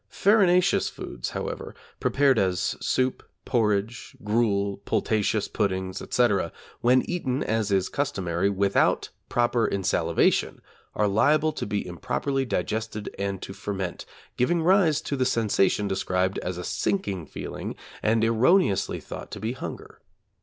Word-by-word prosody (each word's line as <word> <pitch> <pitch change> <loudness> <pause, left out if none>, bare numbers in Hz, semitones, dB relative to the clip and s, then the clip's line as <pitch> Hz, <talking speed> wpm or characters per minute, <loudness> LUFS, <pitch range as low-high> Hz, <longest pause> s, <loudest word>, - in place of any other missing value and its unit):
Farinaceous 185 - +3
foods, - - -6
however, - - -5 0.2
prepared 135 -4 +3
as 95 -2 0
soup, 130 0 0 0.2
porridge, 110 -1 -1
gruel, 105 -2 +1
pultaceous 105 0 0
puddings, 95 -3 -2
etc., 105 -8 +1 0.3
when 125 +2 +4
eaten, 140 -7 -1
as 110 -2 -1
is 95 -2 +2
customary, 95 -9 -1
without 100 0 +2 0.2
proper 120 -1 +2
insalivation, 90 -4 +1 0.4
are 105 - +2
liable 150 +10 +3
to - - -5
be 105 -1 -2
improperly 135 - -2
digested 110 +1 -3
and 100 -1 -3
to 95 - -6
ferment, 95 -3 -5 0.3
giving 165 +7 +2
rise 170 -4 +4
to 140 - -3
the 130 - +1
sensation 105 -4 +2
described 95 -1 0
as 90 -1 -4
a 90 - -5
'sinking 95 - -2
feeling' - - -6 0.3
and 110 +1 +2
erroneously 115 - +3
thought - - -8
to - - -7
be 110 +2 -2
hunger. 130 - -8
110 Hz, 130 wpm, -26 LUFS, 95-130 Hz, 0.4 s, when